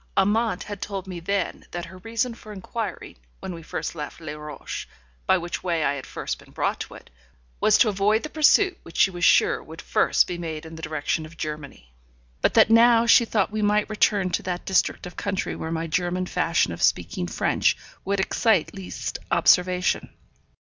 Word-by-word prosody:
Amante 210 0 +2
had 205 0 -7
told 195 -2 -4
me 185 -2 -6
then 195 +1 -2
that 175 0 -5
her 185 +2 -12
reason 230 +4 -2
for 220 -2 -12
inquiring, 210 - -6 0.2
when 185 - -6
we 165 - -8
first 160 - -4
left 150 -1 -7
Les 155 -3 -6
Rochers, 150 -2 -7 0.4
by - - +5
which 175 0 -4
way 170 -3 0
I 140 - +2
had 140 -3 -7
first - - -4
been - - -17
brought - - -1
to - - -7
it, - - -15 0.5
was 215 - +5
to - - +5
avoid 210 +2 +2
the 305 - -4
pursuit 365 +5 +4
which 165 - -11
she 195 - +5
was 175 -1 -6
sure - - +4
would 160 +1 -11
first - - +2
be 175 -1 -5
made 160 -2 -5
in 160 - -10
the 160 - -9
direction 155 0 -2
of 165 +1 -17
Germany; 145 - -7 0.5
but - - +2
that 220 -1 +6
now 230 0 +6
she 235 0 +6
thought 210 -3 0
we 215 0 -2
might 210 +1 +2
return 205 -3 +2
to - - 0
that 180 -1 -4
district 190 - +1
of 180 - -9
country 195 -1 -2
where 160 - -5
my 165 0 -2
German 175 +2 -1
fashion 165 - +1
of - - -8
speaking 90 - +1
French - - +1 0.3
would 200 0 -1
excite 195 -2 +2
least 195 -2 -5
observation. 180 0 +3
185 Hz, 195 wpm, -24 LUFS, 165-210 Hz, 0.5 s, that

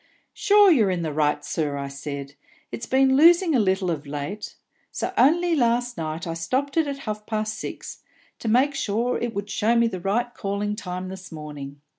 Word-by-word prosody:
'Sure, 410 -1 +5
you're 225 - +4
in 180 -2 -1
the 155 -2 -3
right, 150 -1 0
sir,' 145 -3 -2
said 140 0 -6
I; - - -29 0.4
'it's 230 - -6
been 265 0 +4
losing 335 +3 +6
a 260 - +4
little 190 -3 +1
of 150 -3 -4
late; 145 +9 -5 0.4
so - - -3
only 335 +5 +4
last 245 -2 +1
night 160 0 -4
I 165 - -3
stopped 255 +13 -2
it 325 -2 +2
at 280 -1 -3
half 215 -1 -5
past 215 -1 -2
six, 220 - -7 0.4
to - - -6
make 255 +6 +3
sure 240 -3 -1
it 235 -3 -3
would 200 +1 -4
show 225 +2 +2
me 235 0 +4
the 195 -5 -2
right 240 +6 -1
calling 205 +1 -2
time 185 -3 -5
this 185 -1 -9
morning.' 145 -3 -8
210 Hz, 195 wpm, -24 LUFS, 165-245 Hz, 0.4 s, losing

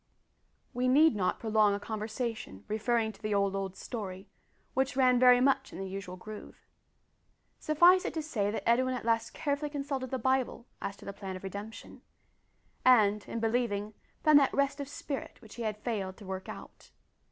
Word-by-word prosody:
We 250 +1 0
need 290 +1 +5
not 185 -3 0
prolong 215 -2 +3
a - - -4
conversation 220 - -5
referring 220 +1 0
to 210 - -20
the 215 -1 -1
"old, 200 -1 +1
old 195 -1 -3
story," 195 -4 -6 0.5
which 265 0 0
ran 255 -2 +4
very 250 -1 +7
much 270 +1 +2
in - - -9
the 195 - -4
usual 190 -1 -6
groove. 215 +3 -11 0.9
Suffice 345 +4 +5
it - - -3
to 320 - -2
say 215 -10 -1
that 215 - -4
Edwin 255 +2 +3
at 245 - -6
last 230 -1 0
carefully 290 0 -1
consulted 275 -3 -3
the 260 - -2
Bible 260 -1 0 0.2
as 200 - -4
to - - -14
the 200 - -5
plan 195 -1 -6
of 185 - -9
redemption; 200 +3 -8 0.8
and, 210 -5 +5
in 230 - -3
believing, 220 -2 -1 0.3
found 305 -1 +7
that 275 - +2
rest 280 +1 +1
of 280 - -4
spirit 285 -1 -6
which 220 -3 -14
he 240 - -8
had 215 -2 -2
failed 205 -4 -3
to 210 - -12
work 190 0 -6
out. - - -11
225 Hz, 185 wpm, -30 LUFS, 205-260 Hz, 0.9 s, very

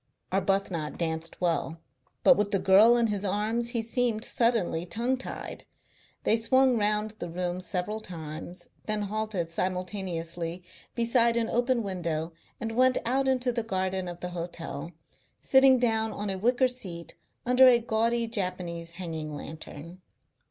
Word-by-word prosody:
Arbuthnot 190 -5 0
danced 160 -1 -3
well, 165 -2 -1 0.4
but 270 - +7
with 210 -3 0
the 200 - +1
girl 205 +6 +6
in 235 - +3
his 205 -3 -2
arms 215 +4 0
he 235 -1 -1
seemed 230 -1 0
suddenly 230 -9 +1
tongue 235 +8 -1
tied. 260 - -7 0.6
They 225 - +4
swung 260 +3 +3
round 210 +1 +1
the 175 - -5
room 175 +1 -3
several 185 +4 -3
times, 165 -2 -7 0.2
then 215 -1 -1
halted 205 -5 -2
simultaneously 180 -2 -3 0.3
beside 235 0 +3
an 230 -1 +1
open 245 0 +1
window 170 -4 -3 0.3
and 225 - -3
went 255 +2 +3
out 265 +3 +1
into 255 -1 +2
the 235 -1 -1
garden 190 -3 -2
of 175 0 -7
the 180 - -3
hotel, 170 -3 -5 0.5
sitting 265 -1 +5
down 225 -2 +1
on 205 -1 -3
a 190 - -3
wicker 245 +5 +3
seat 185 -10 -7 0.3
under 250 +1 +7
a 245 -1 +7
gaudy 230 +1 +1
Japanese 180 -5 -2
hanging 160 -4 -5
lantern. 160 +3 -9
200 Hz, 145 wpm, -28 LUFS, 175-235 Hz, 0.6 s, but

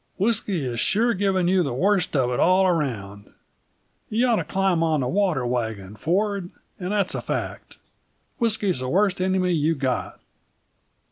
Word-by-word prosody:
"Whisky 200 - 0
is 120 -2 -3
sure 235 - +2
giving 190 -3 +1
you 185 0 +3
the 140 -7 -2
worst 190 +2 +1
of 125 -3 +2
it 120 - -1
all 185 +2 +4
around. 110 - -2 0.8
You 230 +4 +1
ought 235 -3 +3
to - - -1
climb 190 -3 0
on 160 -3 +1
the 125 - -1
water 180 -7 +1
wagon, 110 -5 -3
Ford, 195 - -1 0.3
and 180 +1 -4
that's 205 -3 0
a - - -3
fact. - - -5 0.6
Whisky's 215 - +1
the 130 0 -3
worst 195 +2 +1
enemy 185 -1 +1
you've 160 -1 +1
got." 130 -3 -2
180 Hz, 160 wpm, -24 LUFS, 130-200 Hz, 0.8 s, all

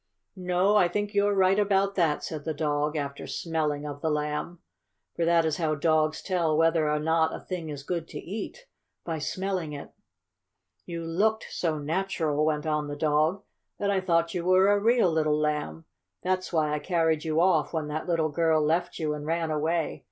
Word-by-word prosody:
"No, 185 +2 +2
I 180 - +5
think 205 +4 -3
you're 205 0 +2
right 190 +1 +4
about 200 -1 +2
that," 165 -6 +1
said 155 -3 -5
the 160 0 -3
dog, 150 0 0
after 140 -2 -4
smelling 150 -3 -2
of 145 -1 -6
the 160 - 0
Lamb. 150 +3 -2 0.6
For 170 - 0
that 170 -1 +3
is 155 -1 0
how 155 -3 0
dogs 155 0 +1
tell 170 -5 +1
whether 165 -1 +3
or 150 - +1
not 160 +1 +1
a - - -7
thing 175 -4 -5
is 145 -2 -6
good 170 +1 -3
to - - -7
eat 220 - -7 0.4
by 165 -2 -3
smelling 185 -1 -3
it. 145 - -8 1.0
"You 170 -1 -5
looked 210 +7 0
so 160 -3 -1
natural," 155 -1 -1
went 155 0 0
on 150 -1 0
the 145 - -5
dog, 155 +6 +1 0.3
"that 200 0 0
I 195 -1 +1
thought 170 -2 +1
you 175 -2 -2
were 185 +2 +4
a 205 - +3
real 225 -3 +3
little 155 -2 +1
Lamb. 150 - -2 0.4
That's 185 0 -1
why 155 -3 +1
I 150 - 0
carried 160 -2 +1
you 160 -1 0
off 185 +2 +3
when 160 -2 -2
that 155 +3 -4
little 165 -3 +1
girl 160 +1 +2
left 165 +4 0
you 155 -2 -1
and 150 -1 -6
ran 165 0 -1
away. 160 +2 -1
165 Hz, 195 wpm, -27 LUFS, 150-185 Hz, 1.0 s, I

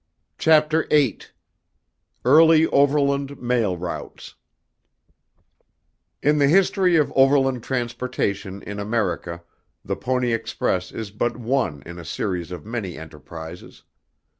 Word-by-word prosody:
Chapter 160 0 +3
VIII 145 -6 +3 1.1
Early 160 +4 +6
Overland 140 -1 +1
Mail 120 -7 0
Routes 85 0 -7 1.9
In 150 +1 +3
the 140 - +4
history 190 +2 +3
of 150 -3 +2
overland 135 -2 +3
transportation 115 -6 -3
in 100 0 -6
America, 100 -5 -2 0.4
the - - -2
Pony 125 -2 -1
Express 95 -5 -2
is 110 -3 -6
but 120 +3 -2
one 115 - -1
in 85 0 -9
a - - -8
series 90 +1 -3
of 90 -4 -8
many 110 -7 -5
enterprises. 80 +2 -10
120 Hz, 110 wpm, -22 LUFS, 95-140 Hz, 1.9 s, Early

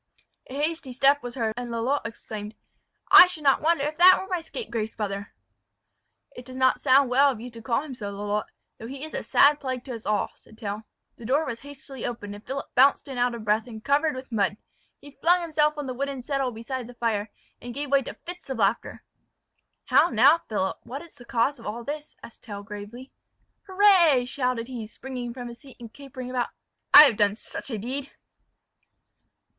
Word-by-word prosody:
A 260 - -9
hasty 300 -2 -2
step 275 +3 +3
was 245 -1 -7
heard; 225 -4 -1
and 245 0 -5
Lalotte 235 +5 -1
exclaimed, 215 -1 -8 0.6
"I 360 - +11
should 350 -4 -5
not 275 -2 +4
wonder 325 -2 +2
if 300 +2 -3
that 370 +1 +9
were 380 - -6
my 365 -3 -2
scrapegrace 235 - -5
brother!" 200 -2 -4 1.0
"It 250 - -9
does 255 +1 -10
not 260 -1 +2
sound 265 0 +4
well 275 +3 +5
of 255 -5 -3
you 245 +2 -8
to 230 0 -11
call 235 +4 0
him 295 -4 -8
so, 210 -5 -6
Lalotte, 205 +1 -3 0.3
though 225 - -8
he 275 +3 -6
is 315 - -11
a - - -2
sad 290 +1 +4
plague 255 -3 -4
to 260 - -7
us 225 -3 -8
all," 210 -1 0
said 220 - -20
Tell. 210 0 -5 0.3
The 235 - -11
door 290 +5 +2
was 235 -5 -5
hastily 275 -2 -10
opened, 205 -4 -5
and 205 +1 -11
Philip 275 +1 -5
bounced 270 +3 +4
in 265 -3 -5
out 245 0 +1
of 225 -2 -8
breath, 215 +3 +1
and 220 -2 -9
covered 295 +1 +2
with 260 0 -9
mud. 205 -2 0 0.4
He 285 - -14
flung 355 +2 +4
himself 300 -2 +1
on 290 -2 -4
a 255 - -3
wooden 275 0 -4
settle 275 -1 -1
beside 240 +2 -6
the 245 - -12
fire, 225 -3 -1 0.3
and 245 - -7
gave 285 -1 -4
way 275 -1 +5
to - - -8
fits 355 -3 -8
of 265 - -3
laughter. 210 +1 -1 0.8
"How 345 - +4
now, 275 +9 +5
Philip! 190 -3 -1
what 275 +5 -7
is 340 - -16
the 245 -4 -15
cause 250 +4 0
of - - -9
all 230 +3 -5
this?" 295 +3 -6
asked 230 - -13
Tell 205 -2 -8
gravely. 210 +5 -9 0.6
"Hurrah!" 370 -9 +5
shouted 250 -2 -1
he, 240 -4 -6
springing 250 +1 -7
from 245 0 -7
his 235 0 -10
seat, 275 -3 -15
and 230 -2 -11
capering 260 -3 -9
about, 250 -1 -1 0.4
"I 295 - +12
have 255 -8 +3
done 205 -1 +2
such 230 - -7
a 225 - -3
deed!" 265 +6 -5
255 Hz, 210 wpm, -25 LUFS, 225-285 Hz, 1.0 s, I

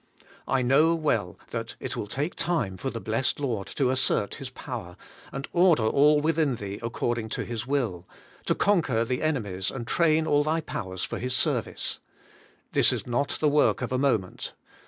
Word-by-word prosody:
I 130 -1 +2
know 150 +7 +4
well 115 - 0
that - - -4
it - - -4
will 105 - -4
take 145 - -2
time 160 - -1
for 135 - -3
the 115 - -5
blessed 115 +6 -1
Lord 115 -9 -2
to 130 -3 +2
assert 130 -5 +1
His 135 - -5
power, 120 -9 -7 0.3
and 135 +1 -5
order 175 -8 +5
all 145 +6 +5
within 155 -3 +2
thee 100 -1 -6
according 115 -1 -2
to - - -2
His 120 0 -4
will 115 -11 -1 0.2
— - - -26
to - - +3
conquer 150 - +2
the 125 +2 -2
enemies 105 -12 -1
and 120 -3 -5
train 160 +3 +3
all 145 -2 +3
thy 160 +2 0
powers 95 - -5
for - - -3
His 125 +1 -1
service. - - -1 0.7
This - - +5
is - - -3
not 125 +4 0
the 155 - +3
work 145 -3 +3
of 125 - -3
a 130 - +1
moment. 115 -9 0
130 Hz, 185 wpm, -27 LUFS, 110-150 Hz, 0.7 s, order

